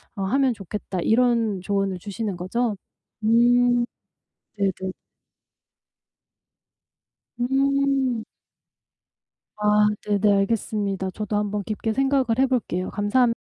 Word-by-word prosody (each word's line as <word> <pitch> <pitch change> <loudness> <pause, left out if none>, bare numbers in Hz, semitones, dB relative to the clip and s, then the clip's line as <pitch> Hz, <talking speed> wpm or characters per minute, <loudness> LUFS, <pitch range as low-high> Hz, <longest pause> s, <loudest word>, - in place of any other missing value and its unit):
어 195 - -3
하면 260 +5 +2
좋겠다.' 195 -2 -5
이런 230 -3 +2
조언을 195 -1 -1
주시는 200 +1 -4
거죠? 215 +5 -1 0.5
음. 240 +2 +4 0.7
네네. 190 -2 -1 2.5
음. 270 -1 +1 1.3
아 210 0 +4 0.2
네네. 205 0 +3
알겠습니다. 195 -2 -1
저도 210 +1 -4
한번 205 0 -1
깊게 220 +2 -2
생각을 270 +1 +2
해볼게요. 245 -9 0
감사합 230 +4 +2
215 Hz, 195 characters per minute, -24 LUFS, 200-245 Hz, 2.5 s, 음